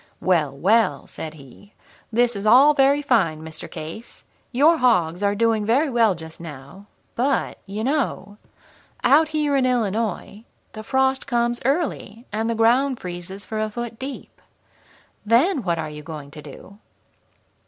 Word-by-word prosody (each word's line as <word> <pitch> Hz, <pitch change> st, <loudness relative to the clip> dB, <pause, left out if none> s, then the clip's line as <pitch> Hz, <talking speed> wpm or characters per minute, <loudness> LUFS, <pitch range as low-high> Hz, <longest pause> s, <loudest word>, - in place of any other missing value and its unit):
"'Well, 155 Hz, -7 st, +1 dB
well,' 195 Hz, -4 st, +2 dB
said 160 Hz, 0 st, -8 dB
he; 150 Hz, +8 st, -16 dB, 0.4 s
'this 240 Hz, +1 st, +2 dB
is 200 Hz, +1 st, -3 dB
all 265 Hz, +7 st, +7 dB
very 280 Hz, +1 st, +3 dB
fine, 170 Hz, -, +1 dB
Mr. 160 Hz, 0 st, -8 dB
Case. 165 Hz, +9 st, -9 dB, 0.3 s
Your 300 Hz, +7 st, +4 dB
hogs 180 Hz, -, +2 dB
are 200 Hz, 0 st, +1 dB
doing 225 Hz, 0 st, +1 dB
very 265 Hz, +7 st, +2 dB
well 225 Hz, -5 st, +3 dB
just 160 Hz, 0 st, -10 dB
now, 155 Hz, +5 st, -11 dB, 0.3 s
but, 265 Hz, +3 st, -1 dB
you 205 Hz, +3 st, -4 dB
know, 255 Hz, -6 st, -2 dB, 0.6 s
out 295 Hz, +5 st, +5 dB
here 300 Hz, -2 st, 0 dB
in 260 Hz, -2 st, +2 dB
Illinois 220 Hz, -3 st, -2 dB, 0.3 s
the 215 Hz, -, -7 dB
frost 265 Hz, +3 st, 0 dB
comes 240 Hz, -2 st, 0 dB
early, 265 Hz, -, -2 dB
and 220 Hz, +2 st, -1 dB
the 230 Hz, -, 0 dB
ground 245 Hz, +4 st, +2 dB
freezes 180 Hz, +3 st, -8 dB
for 220 Hz, -, -4 dB
a 215 Hz, 0 st, -1 dB
foot 235 Hz, +1 st, -6 dB
deep. 270 Hz, +1 st, -8 dB, 0.8 s
Then, 260 Hz, -, +3 dB
what 170 Hz, -5 st, -1 dB
are 160 Hz, -1 st, -3 dB
you 150 Hz, 0 st, -9 dB
going 150 Hz, -3 st, -9 dB
to 150 Hz, 0 st, -10 dB
do?' 155 Hz, +7 st, -13 dB
225 Hz, 155 wpm, -22 LUFS, 175-260 Hz, 0.8 s, all